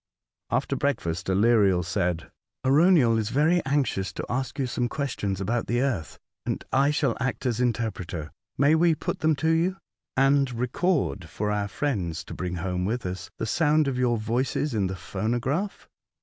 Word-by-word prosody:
After - - 0
break 140 -3 0
fast, 85 +2 -4
Aleriel 100 -2 +4
said: 90 -3 -1 0.2
" - - -20
Arauniel 135 -5 +5
is 110 -1 -1
very 160 +7 +3
anxious 135 -9 0
to - - -5
ask 130 +2 -3
you 135 - 0
some 125 -1 -1
questions 110 -10 -2
about 115 +4 -1
the 120 +1 +1
earth, 110 - -2 0.3
and - - -3
I 135 +2 +4
shall 150 - +1
act 130 +1 -2
as 120 -1 0
interpreter. 100 -9 -2 0.3
May 140 +3 +4
we 165 0 +4
put - - -3
them 155 +1 +3
to 160 +3 0
you, 175 +4 +1 0.4
and 135 0 +4
record 125 - 0
for 105 0 -2
our 105 -1 0
friends, 95 - -2
to - - -9
bring 90 -1 -3
home 90 +1 -2
with 115 +4 -2
us, 95 +1 -5
the - - -2
sound 155 +4 +2
of 130 -2 -1
your 120 -2 +2
voices 120 +6 -1
in 100 -4 +1
the 95 - -4
phonograph?" 120 - -2
120 Hz, 175 wpm, -26 LUFS, 95-140 Hz, 0.4 s, Arauniel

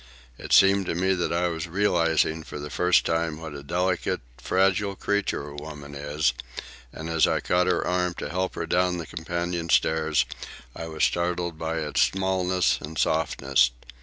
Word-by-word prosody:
It - - -8
seemed 95 -1 +5
to - - -1
me 95 +2 +2
that 90 -2 -1
I 85 +1 +1
was 80 -1 -4
realizing 85 -4 +1
for 80 - -8
the 75 0 -7
first 90 0 +3
time 80 -1 -1
what 80 -2 -7
a 70 - -7
delicate, 90 +5 -1 0.2
fragile 95 - +1
creature 100 -8 -1
a 70 - -10
woman 75 -1 -8
is; 75 0 0 0.6
and 80 - -7
as 80 -1 +3
I - - +1
caught 90 0 +1
her 90 -2 +1
arm 90 -1 0
to - - -5
help 95 +1 -2
her 85 - -3
down 90 +1 +1
the 85 - -5
companion 85 +1 -3
stairs, 80 -2 +2 0.5
I 80 - -6
was 80 -1 -3
startled 85 -1 0
by 80 0 -2
its 75 -1 0
smallness 95 -1 +1
and 75 +1 -7
softness. 70 -5 +2
85 Hz, 175 wpm, -26 LUFS, 80-90 Hz, 0.6 s, seemed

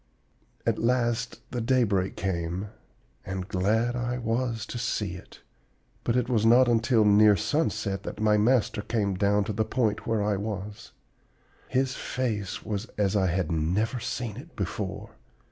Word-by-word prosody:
"At - - +1
last 120 0 0
the 120 - -2
daybreak 110 -6 +1
came, 90 +1 -2 0.5
and 95 -1 -4
glad 110 +6 +1
I 120 0 -2
was 115 -1 -1
to 120 - -6
see 105 -5 -1
it. 90 - -12 0.6
But 120 - 0
it 125 -2 +1
was 115 -4 +1
not 120 +3 +6
until 115 -1 +3
near 105 0 +6
sunset 105 - -1
that - - -7
my 105 0 +3
master 110 0 +2
came 100 -3 -1
down 100 +2 +2
to 105 - -3
the 110 +2 +1
point 110 -2 -1
where 110 -2 +1
I 105 -1 +1
was. 105 0 -5 0.8
His 130 0 0
face 110 -9 -3
was 105 +1 -3
as 100 -1 +1
I 95 -2 +3
had 90 -1 0
never 95 +10 0
seen 115 -2 -4
it 160 +6 -11
before. 100 +1 -4
105 Hz, 155 wpm, -27 LUFS, 100-120 Hz, 0.8 s, not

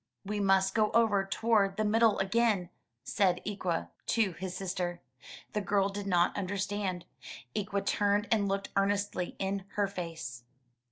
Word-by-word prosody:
'We 210 +1 -2
must 195 -1 +3
go 215 -1 +3
over 220 -4 +4
toward 200 -2 +2
the 215 - +1
middle 220 0 +4
again,'' 195 -2 +1 0.3
said 180 +4 +2
Ikwa, 185 -5 -2 0.2
to 220 -4 +2
his 185 +2 -5
sister. 180 -2 -3 0.5
The 210 - 0
girl 200 0 +2
did 200 0 -5
not 175 -2 +3
understand. 200 -1 -2 0.5
Ikwa 200 -1 -1
turned, 205 +1 +2
and 210 -3 +3
looked 195 0 -2
earnestly 200 -2 0
in 195 0 -2
her 205 - +2
face. 165 -10 -6
195 Hz, 145 wpm, -31 LUFS, 190-205 Hz, 0.5 s, over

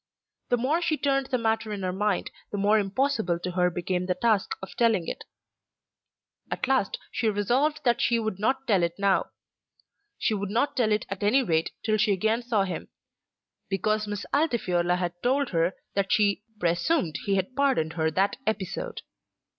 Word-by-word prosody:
The 245 - +3
more 285 +8 +1
she 315 -3 +1
turned 275 -2 +1
the 255 - 0
matter 225 -1 0
in 200 -2 -4
her 185 0 -1
mind, 205 0 0 0.2
the 205 - -3
more 205 +2 +4
impossible 210 -3 0
to 180 +1 -4
her 180 0 +2
became 180 +1 -2
the 180 - +1
task 215 0 +1
of 190 - -9
telling 225 -8 +2
it. - - -5 1.2
At 260 - -2
last 260 -7 +1
she 225 - 0
resolved 250 +10 +1
that 240 -2 +2
she 235 - +3
would 220 -4 -2
not 265 +5 0
tell 200 -7 +3
it 170 0 0
now. 200 -1 +2 0.9
She - - 0
would 200 -1 -2
not 235 +7 0
tell 235 -5 +2
it 210 - +1
at 195 0 -5
any 220 +7 +4
rate 165 -6 +1 0.2
till 215 -1 +2
she 210 -1 +3
again 220 +5 +1
saw 230 -4 +1
him, 180 -4 -4 0.8
because 215 +2 0
Miss 205 0 -4
Altifiorla 185 - +1
had 175 -1 -3
told 270 +2 +1
her 170 +1 +1 0.2
that 195 -2 0
she 205 -2 +3 0.2
"presumed 175 - +1
he 200 - +2
had 190 +6 -2
pardoned 265 - +1
her 160 -1 +1
that 190 +5 +1
episode." 220 - -3
210 Hz, 180 wpm, -27 LUFS, 185-240 Hz, 1.2 s, more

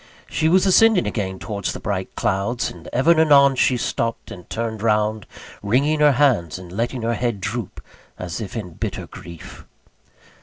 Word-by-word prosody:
She 160 - 0
was 185 +3 +4
ascending 200 0 +5
again 95 -4 -3
towards 100 -1 -4
the - - -7
bright - - -4
clouds, 100 +6 -1
and 85 -2 -13
ever 135 +7 +3
and 165 - +4
anon 140 -3 +5
she 125 0 +2
stopped 115 -1 -3
and 90 -2 -11
turned 115 -2 -4
round, 105 -1 0 0.3
wringing 140 +9 +1
her 150 -1 +5
hands 120 - +2
and 90 -1 -11
letting 115 +4 -3
her 115 +1 0
head 120 -2 -2
droop, 105 +5 -5 0.4
as 90 +2 -5
if 100 -1 -7
in 95 -6 -6
bitter - - -5
grief. 85 -2 -11
115 Hz, 175 wpm, -21 LUFS, 100-140 Hz, 0.4 s, ascending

